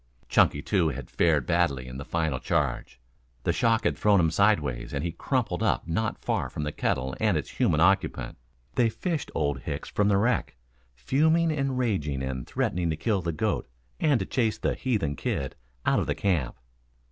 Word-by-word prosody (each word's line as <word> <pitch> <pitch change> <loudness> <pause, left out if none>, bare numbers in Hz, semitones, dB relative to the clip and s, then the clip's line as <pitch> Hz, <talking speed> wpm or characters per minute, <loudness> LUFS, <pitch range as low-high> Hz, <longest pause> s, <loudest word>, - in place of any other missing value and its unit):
Chunky 70 - +3
too 90 -6 +2
had 65 -3 -7
fared 80 -6 +2
badly 80 -7 +1
in 65 +1 -7
the 70 - -5
final 80 -4 -1
charge. 65 -1 -1 0.4
The - - +1
shock 115 -1 +2
had - - +1
thrown 105 -2 +4
him 80 -2 +3
sideways 75 - +1
and 70 - -2
he 85 - -1
crumpled - - -1
up - - +1
not 110 +7 -1
far - - -2
from 75 - -5
the 75 - -2
kettle 65 -2 -1
and - - +2
its - - -4
human 75 - +1
occupant. 95 -5 +1 0.3
They 120 -2 +3
fished 165 - -3
Old 70 -3 0
Hicks - - -5
from 105 - +1
the 100 -1 +4
wreck, 120 +5 +1 0.4
fuming 160 - +2
and 135 -3 -1
raging 75 - -1
and 65 -1 -4
threatening 100 -10 -1
to 80 - 0
kill 100 +2 0
the 85 -1 -2
goat 75 - -1 0.3
and 150 -6 +3
to 95 - -2
chase 110 -2 0
the - - 0
"heathen 100 - -1
kid" 65 +1 -3 0.3
out - - +3
of - - -1
the - - 0
camp. 85 -11 0
85 Hz, 190 wpm, -27 LUFS, 70-110 Hz, 0.4 s, thrown